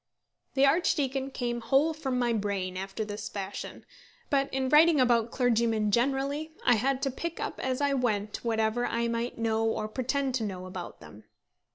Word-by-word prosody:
The 270 0 +5
archdeacon 275 -3 +1
came 240 -2 -3
whole 275 +7 +3
from 270 -5 -2
my 240 -1 +1
brain 200 -4 -2
after 195 +3 -4
this 205 0 -5
fashion; 195 -1 -6 0.5
but 275 -1 +2
in 265 0 0
writing 305 +2 +6
about 240 -2 +3
clergymen 230 -4 +1
generally, 275 +6 0
I 245 - +6
had 265 +4 0
to 270 - +1
pick 335 +6 -5
up - - -4
as 260 +1 -1
I 285 -1 +2
went 215 -5 -1
whatever 225 +1 +1
I 235 0 0
might 235 +1 -2
know 225 -1 0
or 225 -1 0
pretend 260 +4 -1
to 245 -3 -1
know 185 -3 -4
about 185 -1 -8
them. 105 +1 -13
245 Hz, 175 wpm, -29 LUFS, 220-275 Hz, 0.5 s, writing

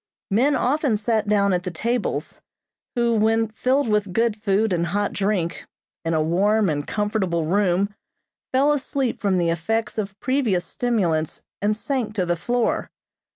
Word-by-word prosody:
Men 265 +8 +3
often 270 -3 +1
sat 220 0 0
down 200 -2 +3
at 180 - +1
the 180 - -4
tables, 230 +7 -2 0.5
who, 235 -1 +2
when 225 0 +2
filled 255 +5 +1
with 210 -3 0
good 230 0 +2
food 210 -1 +1
and 170 -1 0
hot 205 +4 -1
drink, 195 -4 -1 0.4
in 165 0 0
a 155 - +2
warm 200 +5 +2
and 145 -1 -3
comfortable 205 -6 -1
room 195 +2 +1 0.6
fell 275 +3 +4
asleep 270 -3 -2
from 195 -3 +2
the 170 -1 +2
effects 220 +7 -1
of 200 -1 -5
previous 250 -10 +1
stimulants 175 -11 -1 0.2
and 210 +1 +2
sank 230 -2 -2
to 185 -4 +1
the 175 0 +1
floor. 240 +7 -1
210 Hz, 155 wpm, -23 LUFS, 180-230 Hz, 0.6 s, fell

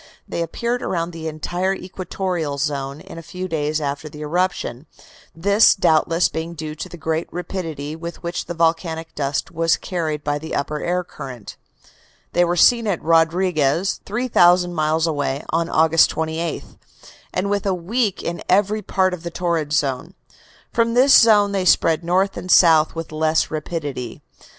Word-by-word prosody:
They - - -3
appeared 235 +9 -2
around 170 -1 -2
the 165 -1 -6
entire 175 +5 -2
equatorial 180 -5 -4
zone 140 0 -3
in 165 - -10
a - - -8
few 180 +3 -6
days 155 -2 -1
after 145 +1 -4
the 150 +1 -11
eruption, 160 -4 -2 0.5
this 200 +6 +4
doubtless 165 -1 +3
being 165 +1 -5
due 155 -1 -5
to 155 - -7
the 175 - -10
great 160 +1 -2
rapidity 165 -4 -5
with 170 +2 -8
which 170 +1 -3
the 175 - -6
volcanic 165 0 -1
dust 140 -1 -2
was 165 -1 +1
carried 155 -5 -3
by 145 0 -1
the 160 +1 -5
upper 150 +2 -2
air 180 +1 -1
current. 125 -9 -9 0.8
They 175 - +4
were 175 0 +1
seen 230 +6 +4
at 190 -5 0
Rodriguez, 165 0 +2
3,000 180 -6 +3
miles 155 0 +1
away, 145 -3 -2
on 165 +1 0
August 160 +1 +4
28, 160 0 -3 0.7
and 200 +2 -1
within 200 -1 0
a 190 - +1
week 205 +4 -1
in 170 0 -4
every 205 +3 +2
part 185 -1 +1
of 180 - -6
the 170 - -5
torrid 170 -3 -2
zone. 145 +4 -1 0.6
From 230 0 +1
this 265 +2 +6
zone 210 -3 +6
they 195 -2 0
spread 165 -2 +3
north 185 +3 +1
and 185 - -7
south 160 -4 +5
with 165 -1 -6
less 155 +1 +1
rapidity. 145 -6 -5
165 Hz, 165 wpm, -21 LUFS, 155-185 Hz, 0.8 s, this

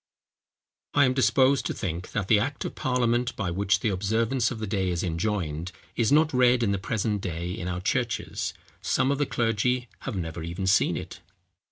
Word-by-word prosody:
] - - -66
I 145 -1 +6
am 130 - +2
disposed 130 +1 +3
to - - -3
think, 90 -3 -4
that 100 -3 -1
the 105 -1 +5
act 135 +6 -2
of - - -4
parliament 125 -1 0
by 100 -5 -2
which 100 +2 +1
the 110 - +1
observance 110 +5 +1
of 125 - -5
the 110 - -3
day 95 -3 -1
is 85 -1 -1
enjoined, 85 -2 -2 0.2
is 115 0 +1
not 155 +1 +4
read, 125 -1 +4
in 100 - +2
the 100 - 0
present 105 0 -1
day, 85 -1 -3
in 90 -1 -4
our 90 0 -3
churches: 120 +3 -1 0.3
some 130 - +1
of 140 - -1
the 145 - +1
clergy 120 +1 0
have 130 - -5
never 80 -2 -4
even 85 +4 -4
seen 95 +1 +3
it. - - -7
105 Hz, 200 wpm, -26 LUFS, 90-125 Hz, 0.3 s, I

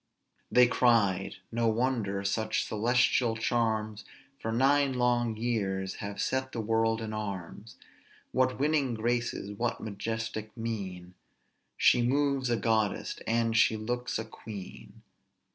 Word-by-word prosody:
] - - -46
"They 125 0 +7
cried, 110 -6 +2 0.2
No 115 0 +1
wonder 110 -4 0
such 110 +2 0
celestial 120 +1 +2
charms 110 -2 0 0.4
For 115 - -3
nine 135 +3 +3
long 120 -2 +1
years 100 -5 -1
have 100 0 -6
set 130 0 -1
the 115 - -3
world 115 +1 +1
in 110 -1 -4
arms; 105 0 -6 0.5
What 130 0 +1
winning 145 -4 +1
graces! 120 -2 -1
what 115 +4 -2
majestic 110 +1 -4
mien! 95 -6 -5 0.6
She 120 - +5
moves 135 +1 +1
a 120 - +2
goddess, 110 -1 0
and 115 0 +1
she 110 -1 +4
looks 120 +3 -2
a 110 - -4
queen." 105 -3 -10
115 Hz, 125 wpm, -29 LUFS, 105-120 Hz, 0.6 s, They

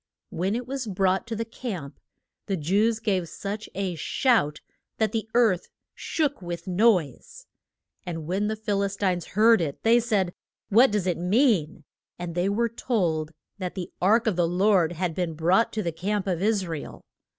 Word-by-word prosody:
When 190 +5 -1
it 245 +1 -3
was 265 -1 -4
brought 190 +1 +1
to 230 - -3
the 230 +1 -3
camp 185 - -6 0.5
the 195 - -1
Jews 205 +8 +2
gave 190 -6 -1
such 205 +5 -6
a 190 -2 -2
shout 165 - +1 0.4
that 220 -1 +1
the 220 -1 -3
earth 220 -7 +3 0.3
shook 290 -6 -2
with 175 -1 -6
the 185 - -4
noise. 225 - +1 0.6
And 165 -5 -5
when 190 +5 -1
the 220 - -1
Phil 210 -2 -1
is 200 0 -1
tines 185 -4 0
heard 225 -2 +6
it, 145 -4 -4
they 230 +1 +5
said, 205 -7 0 0.4
What 235 +6 +6
does 210 -3 -1
it 180 -3 0
mean? 180 - +2 0.3
And 175 -1 -5
they 180 +3 0
were 230 +4 +1
told 180 -10 -1 0.3
that 180 -2 -4
the 185 -3 -5
ark 215 +5 +4
of 220 -5 +1
the 175 -1 +3
Lord 180 -1 +3
had 175 0 -2
been 170 -2 -2
brought 180 +8 +2
to 215 - -2
the 170 - -1
camp 195 +5 -2
of 180 -3 -1
Is 205 -2 +1
ra 165 -3 -4
el. - - -11
195 Hz, 185 wpm, -26 LUFS, 175-220 Hz, 0.6 s, heard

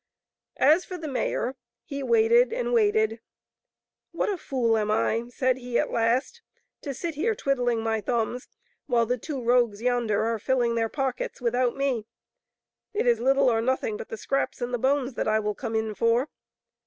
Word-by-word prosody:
As 310 +7 +5
for 365 - -7
the 325 -2 -6
mayor, 260 -1 -1 0.3
he 280 -2 -5
waited 465 - +4
and - - -2
waited. 435 -1 +2 0.5
" - - -65
What - - 0
a 400 - -1
fool 240 -6 0
am 215 -1 0
I," 220 +2 +1
said 255 +1 0
he 245 -1 -2
at - - 0
last, 235 +3 0 0.2
" - - -52
to 280 -2 -5
sit 335 +5 -4
here 390 +10 0
twiddling 245 - 0
my 225 -1 0
thumbs 235 +3 -2 0.4
while 240 -3 +2
the 250 +2 -1
two 285 +2 -5
rogues 235 -3 +2
yonder 235 -3 +1
are 225 0 -1
filling 245 0 +1
their 225 -1 0
pockets 270 -1 -3
without 245 0 +1
me. 260 -6 -1 0.9
It 415 - +1
is 235 -2 +3
little 270 +2 +3
or 225 -1 +1
nothing 245 -3 0
but 210 - -8
the 225 - -5
scraps 275 +5 -2
and 245 0 -3
the 245 - 0
bones 270 +1 +1
that - - -2
I 215 0 +3
will 210 -1 -1
come 225 +1 -5
in 220 -1 -1
for." 230 +6 +1
245 Hz, 190 wpm, -26 LUFS, 230-275 Hz, 0.9 s, As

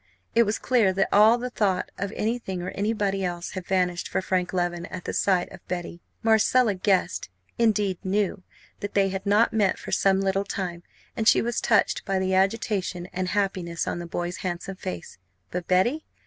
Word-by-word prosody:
It 235 0 +5
was 210 - 0
clear 235 -7 +3
that 195 +1 +1
all 225 +4 +5
thought 200 -6 0
of 200 +1 -2
anything 215 -5 -2
or 180 - -4
anybody 200 -2 -1
else 175 -1 -3
had 185 -2 -6
vanished 180 -2 0
for - - -1
Frank 185 -1 -1
Leven 175 -1 -1
at 180 - -8
the - - -3
sight 185 -3 +1
of - - -10
Betty. 175 -1 -5 0.2
Marcella 225 +1 +4
guessed, 185 - 0 0.3
indeed 210 -5 +2
knew, 195 0 0 0.4
that 205 - -6
they 195 -1 +3
had 190 +1 -4
not 210 +3 +4
met 205 -4 +2
for - - -8
some 195 -1 +3
little 195 0 +1
time; 180 -3 -4 0.3
and 220 - -1
she - - +7
was 235 0 -1
touched 220 - +2
by 195 - -1
the 190 0 0
agitation 190 -2 0
and 185 0 -2
happiness 185 -3 -1
on - - -2
the 175 - -6
boy's 175 +1 -3
handsome 185 +2 -4
face. 90 - -7 0.3
But 180 -1 -4
Betty? 240 +13 +2
190 Hz, 185 wpm, -25 LUFS, 180-210 Hz, 0.4 s, she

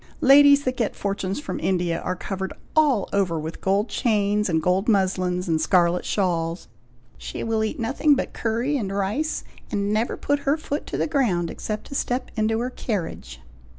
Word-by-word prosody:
Ladies 285 +1 +7
that 255 -1 -2
get 230 -4 -1
fortunes 200 0 -2
from 295 - -5
India 175 -3 0
are 180 - -2
covered 190 +1 -4 0.2
all 285 -10 +3
over 185 -5 +1
with 160 +2 -6
gold 200 +3 +1
chains, 210 -3 +1
and 160 -2 +2
gold 180 +5 +1
muslins, 185 -3 +1
and 160 -2 +1
scarlet 175 -1 +2
shawls. 170 -3 -1 0.5
She - - -6
will 225 -1 0
eat 220 - -3
nothing 275 +5 +2
but 275 - -3
curry 235 +6 -1
and 200 -6 -3
rice, 205 +11 -1 0.3
and 205 0 -1
never 220 +3 0
put 285 0 0
her 280 +2 +1
foot 300 -1 -4
to - - -3
the - - +1
ground 220 - 0
except 215 -1 -5
to - - -10
step 255 -1 -2
into 220 0 +1
her 250 +1 -2
carriage." 165 - -4
205 Hz, 180 wpm, -24 LUFS, 180-255 Hz, 0.5 s, Ladies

